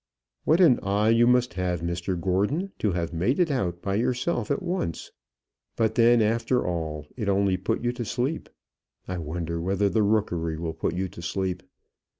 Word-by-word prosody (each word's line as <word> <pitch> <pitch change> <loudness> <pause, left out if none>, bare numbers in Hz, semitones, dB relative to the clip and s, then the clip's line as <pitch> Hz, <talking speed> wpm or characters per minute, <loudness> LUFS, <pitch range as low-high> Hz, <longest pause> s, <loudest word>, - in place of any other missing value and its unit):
What 160 +3 +4
an 150 -9 +6
eye 100 +2 +1
you 115 +1 +5
must 125 0 +3
have, 90 -2 -2
Mr 85 +1 -2
Gordon, 105 - 0
to 105 -4 +1
have 85 -1 -2
made 95 - 0
it 170 -4 +3
out 90 -10 -2
by 100 - -1
yourself 125 +2 0
at 195 - -1
once; 175 - -3 0.6
but 110 -1 +1
then, 120 -1 +5
after 115 +3 +1
all, 80 -4 -3
it 105 -5 -2
only 100 -1 +2
put 105 +6 -2
you 120 - +1
to 120 0 -5
sleep. 130 +7 -2 0.6
I 90 -1 -3
wonder 85 +1 -3
whether 100 +3 +1
the 110 - +1
Rookery 90 -7 0
will 80 0 -3
put 80 - -2
you 95 +1 -1
to 85 - -10
sleep. 90 +2 -2
100 Hz, 180 wpm, -26 LUFS, 85-120 Hz, 0.6 s, an